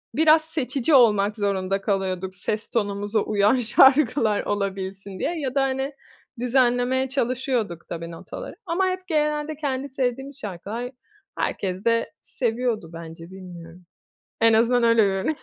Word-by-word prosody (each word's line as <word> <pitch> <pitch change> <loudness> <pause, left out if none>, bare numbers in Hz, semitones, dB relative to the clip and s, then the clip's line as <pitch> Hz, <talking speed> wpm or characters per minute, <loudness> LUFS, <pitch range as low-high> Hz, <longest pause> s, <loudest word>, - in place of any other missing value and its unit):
biraz 315 +2 +6
seçici 300 -2 -1
olmak 210 -5 +5
zorunda 195 -1 -1
kalıyorduk, 190 -2 -2
ses 210 +4 -3
tonumuza 205 -1 -1
uyan 205 +3 +2
şarkılar 250 -2 +4
olabilsin 195 -1 -4
diye 340 -1 -2
ya 270 -3 -3
da 275 - +3
hani 270 +1 -1 0.5
düzenlemeye 250 +1 +2
çalışıyorduk 250 - -2
tabii 170 0 -5
notaları. 165 - -8
Ama 370 +2 +1
hep 370 0 -3
genelde 300 -1 0
kendi 280 -2 -3
sevdiğimiz 270 +1 -3
şarkılar, 210 +5 -5 0.5
herkes 190 +1 -2
de 230 0 +1
seviyordu 235 -6 -2
bence, 165 +1 -9
bilmiyorum. 180 -2 -11 0.6
En 230 0 +5
azından 235 +2 +3
öyle 230 -1 +5
görünüyor. 195 +9 0
230 Hz, 130 wpm, -24 LUFS, 195-265 Hz, 0.6 s, biraz